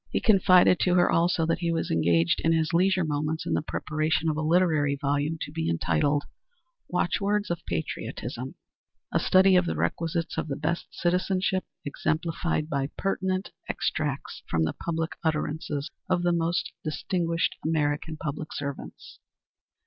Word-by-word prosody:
He - - 0
confided 185 -4 +5
to 180 -1 +2
her, 175 -1 +4
also, 170 -1 +2
that 165 - 0
he 170 -1 0
was 165 - -1
engaged 85 +1 +2
in 165 - +3
his 160 0 +1
leisure 185 +1 +3
moments 155 +1 -2
in - - -1
the - - +1
preparation 155 0 -1
of 155 - 0
a 155 - -2
literary 155 -3 +3
volume 145 +3 0
to - - -4
be 160 +1 -2
entitled, 85 - +1 0.7
"Watchwords 205 -1 0
of 170 - -3
Patriotism," - - -4 0.6
a - - +3
study 190 0 +5
of 180 -1 +4
the - - -1
requisites 165 0 -1
of - - -3
the 140 - -2
best 155 +4 -2
citizenship, 185 +2 0 0.2
exemplified 155 +2 -1
by 140 -3 -1
pertinent 190 0 -1 0.2
extracts 145 -3 -2
from 80 -1 +1
the 80 - 0
public 165 -1 -3
utterances 155 -1 -2 0.2
of 180 -1 +1
the 175 0 +3
most 170 0 0
distinguished 165 +2 -1
American 155 0 0
public 150 0 -5
servants. 140 -1 -7
160 Hz, 150 wpm, -27 LUFS, 150-175 Hz, 0.7 s, confided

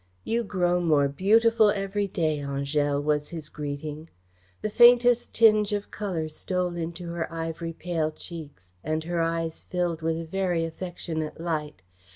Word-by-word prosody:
"You 235 +1 0
grow 180 -4 +1
more 150 -4 +3
beautiful 220 +8 +4
every 200 0 -1
day, 160 -5 0
Angèle," 140 +1 0
was 150 0 0
his 160 -3 -7
greeting. 150 +2 -6 0.5
The 215 - 0
faintest 240 +1 +6
tinge 215 -2 +4
of 205 0 -3
colour 180 -7 -3
stole 180 +3 -2
into 170 +1 -5
her 170 -1 -3
ivory 165 0 -4
pale 165 -2 -1
cheeks, 150 - -11
and 155 +1 -1
her 170 0 -1
eyes 165 0 -1
filled 175 -3 -2
with 165 0 0
a 165 - -5
very 175 -1 0
affectionate 165 -2 -5
light. 155 - -3
165 Hz, 150 wpm, -26 LUFS, 155-190 Hz, 0.5 s, faintest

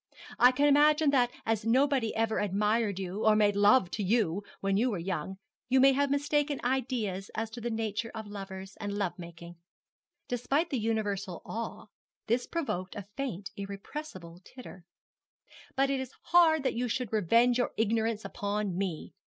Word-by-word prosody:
'I 250 +1 +7
can 285 +3 +2
imagine 295 +1 +5
that 250 -3 +3 0.2
as 225 -2 0
nobody 255 0 +2
ever 225 0 0
admired 210 +1 +1
you 195 +2 -4
or 215 -1 +5
made 205 -1 +3
love 205 -2 +4
to 210 - -3
you 205 -3 +1 0.2
when 195 0 0
you 235 +6 +2
were 210 - -2
young, 185 +1 -4 0.3
you 260 +1 +4
may 270 +1 +7
have 285 +1 +1
mistaken 290 0 0
ideas 240 -7 -1
as 225 0 -3
to 235 +1 -8
the 240 - -2
nature 225 0 -2
of 220 -1 -5
lovers 195 -1 -8
and 205 0 -3
love 195 -4 -1
making' 170 0 -10 0.7
despite 275 +7 0
the 265 - 0
universal 205 -5 -2
awe, 230 +1 -5 0.4
this 240 +2 0
provoked 185 - -3
a 200 -3 -6
faint, 205 -9 -4
irrepressible 195 - -8
titter 195 -8 -12 0.9
'but 275 +1 +2
it 270 - 0
is 260 0 -7 0.2
hard 325 -4 +5
that - - 0
you 245 +1 -1
should 245 -1 -3
revenge 230 +5 +3
your 245 - +1
ignorance 225 0 0
upon 205 -2 -2
me. 185 -4 -3
220 Hz, 165 wpm, -30 LUFS, 195-260 Hz, 0.9 s, I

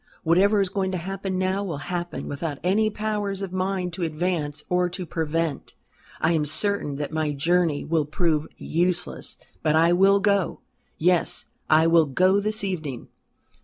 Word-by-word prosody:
Whatever 195 +6 +4
is 195 - 0
going 190 -1 -1
to - - 0
happen 190 +1 -4
now 190 +2 0
will 170 -7 -4
happen 175 +4 -4
without 145 0 -4
any 210 +4 +2
power 210 -1 -2
of 195 -1 -4
mine 185 -1 -1
to 180 +2 -6
advance 155 -2 -2
or 180 0 +1
to 180 +1 -5
prevent. 160 -1 -2 0.4
I 160 - +2
am 160 -3 +2
certain 155 0 0
that 145 +1 -4
my 155 -2 -1
journey 165 +1 +1
will 160 -2 +1
prove 155 -1 0
useless. 175 +1 -2 0.2
But 155 -1 +2
I 165 +2 +5
will 195 +2 +5
go. 200 -2 +1 0.4
Yes, 175 +1 +1 0.2
I 155 +1 +5
will 165 -2 +5
go 185 +8 +3
this 215 +1 -1
evening." 155 -10 -4
175 Hz, 165 wpm, -24 LUFS, 160-195 Hz, 0.4 s, I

